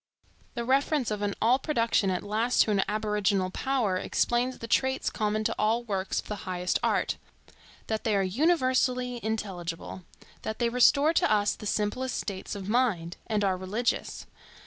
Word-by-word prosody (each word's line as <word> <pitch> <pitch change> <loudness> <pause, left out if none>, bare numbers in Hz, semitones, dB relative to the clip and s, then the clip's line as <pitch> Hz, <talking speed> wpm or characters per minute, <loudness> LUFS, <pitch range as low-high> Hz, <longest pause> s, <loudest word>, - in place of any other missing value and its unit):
The 235 -1 -3
reference 270 -1 +1
of 210 -1 -2 0.2
all 245 +4 +4
production 230 -8 +1
at 180 -1 -1
last 220 +4 +2
to 215 - -1
an 200 -2 +3
aboriginal 210 -2 0
Power 240 -6 0
explains 240 +6 0
the 230 - -7
traits 265 +2 +1
common 215 0 -1
to - - 0
all 225 +3 +2
works 195 -4 -2
of - - -8
the 210 - -4
highest 180 0 0
art,—that 220 -1 -4
they 220 -4 +1
are 195 - +2
universally 255 - +1
intelligible; 190 -5 -4 0.4
that 220 - -4
they 235 -1 +1
restore 280 +6 +4
to - - +2
us 205 -1 +3
the 210 - -7
simplest 220 +6 -1
states 195 0 -4
of 195 -1 -6
mind, 210 -8 0
and 215 -2 0
are 190 -2 +2
religious. 205 +6 -2
215 Hz, 160 wpm, -28 LUFS, 200-250 Hz, 0.4 s, all